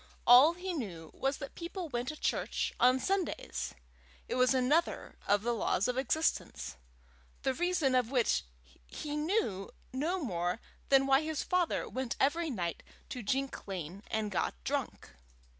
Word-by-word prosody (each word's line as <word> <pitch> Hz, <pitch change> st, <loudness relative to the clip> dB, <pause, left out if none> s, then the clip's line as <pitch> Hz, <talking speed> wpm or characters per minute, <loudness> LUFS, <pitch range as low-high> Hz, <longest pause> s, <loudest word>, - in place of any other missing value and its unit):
All 255 Hz, +7 st, +9 dB
he 365 Hz, +1 st, -4 dB
knew 180 Hz, -, -5 dB
was 270 Hz, +1 st, -1 dB
that 275 Hz, -, -7 dB
people 345 Hz, +1 st, -5 dB
went 245 Hz, -3 st, -3 dB
to 310 Hz, -, -3 dB
church -, -, -1 dB
on 255 Hz, +1 st, +5 dB
Sundays. 380 Hz, +3 st, -2 dB, 0.5 s
It -, -, -3 dB
was 255 Hz, 0 st, +4 dB
another 270 Hz, +6 st, +1 dB
of 205 Hz, +1 st, +3 dB
the 240 Hz, +1 st, +1 dB
laws 205 Hz, -3 st, +1 dB
of 250 Hz, -, 0 dB
existence, 260 Hz, -, 0 dB, 0.7 s
the 265 Hz, -, +2 dB
reason 345 Hz, -3 st, +1 dB
of 250 Hz, -3 st, +3 dB
which 250 Hz, -4 st, +2 dB, 0.4 s
he 295 Hz, -, -5 dB
knew 300 Hz, -, 0 dB, 0.2 s
no 315 Hz, +8 st, 0 dB
more 180 Hz, -, -1 dB, 0.3 s
than 270 Hz, -1 st, +6 dB
why 270 Hz, +1 st, +5 dB
his 315 Hz, -1 st, -2 dB
father 360 Hz, -2 st, +1 dB
went 255 Hz, -2 st, -3 dB
every 320 Hz, +4 st, +2 dB
night 175 Hz, -, -3 dB, 0.3 s
to 250 Hz, -, -4 dB
Jink 265 Hz, +4 st, -2 dB
Lane 185 Hz, 0 st, -5 dB
and 215 Hz, -1 st, -1 dB
got 175 Hz, -, 0 dB
drunk. -, -, -3 dB
260 Hz, 155 wpm, -32 LUFS, 220-315 Hz, 0.7 s, All